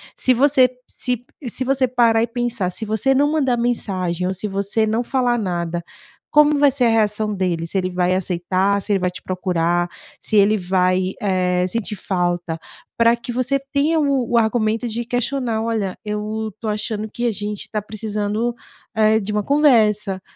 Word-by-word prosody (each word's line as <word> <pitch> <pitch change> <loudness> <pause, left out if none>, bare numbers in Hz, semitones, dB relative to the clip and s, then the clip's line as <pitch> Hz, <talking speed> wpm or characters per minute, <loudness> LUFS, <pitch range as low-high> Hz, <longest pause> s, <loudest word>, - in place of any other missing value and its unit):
Se 255 - +3
você 260 0 +4 0.2
se 245 -1 -3 0.2
se 245 +2 -2
você 265 0 +2
parar 230 -2 +3
e - - 0
pensar, 235 -5 -2
se 220 - -5
você 220 +5 +1
não 285 +2 +3
mandar 265 -6 +1
mensagem 185 -7 -1
ou 190 - -1
se 190 +3 -5
você 200 +2 0
não 225 +3 0
falar 245 -1 +1
nada, 175 -4 -2 0.5
como 300 0 +5
vai 285 -1 +5
ser 255 -2 +1
a - - +4
reação 215 -1 +1
dele? 175 -4 -1
Se 195 - -2
ele 185 -1 0
vai 180 0 +1
aceitar, 190 +2 0
se 210 - -5
ele 195 - +2
vai 180 0 0
te - - -10
procurar, 175 -1 0 0.3
se 215 - 0
ele 205 +2 +5
vai, 185 0 +1
eh, 180 -3 +1
sentir 215 +1 -3
falta, 175 -3 -1 0.4
pra 230 0 +5
que 235 +1 -7
você 255 +3 +1
tenha 305 +3 +2
o 275 -5 0
o 235 - +3
argumento 225 +1 +1
de 235 +1 -3
questionar: 245 -2 -1
"Olha, 220 -5 -2
eu 215 +1 -3
tô 225 - -4
achando 215 0 -3
que 240 0 -2
a 235 - +2
gente 205 0 -5
tá 215 -1 -2
precisando, 215 +2 -3 0.4
eh, 220 0 +4
de 210 0 -4
uma 210 -1 0
conversa, 215 -9 +3
215 Hz, 185 wpm, -20 LUFS, 190-240 Hz, 0.5 s, como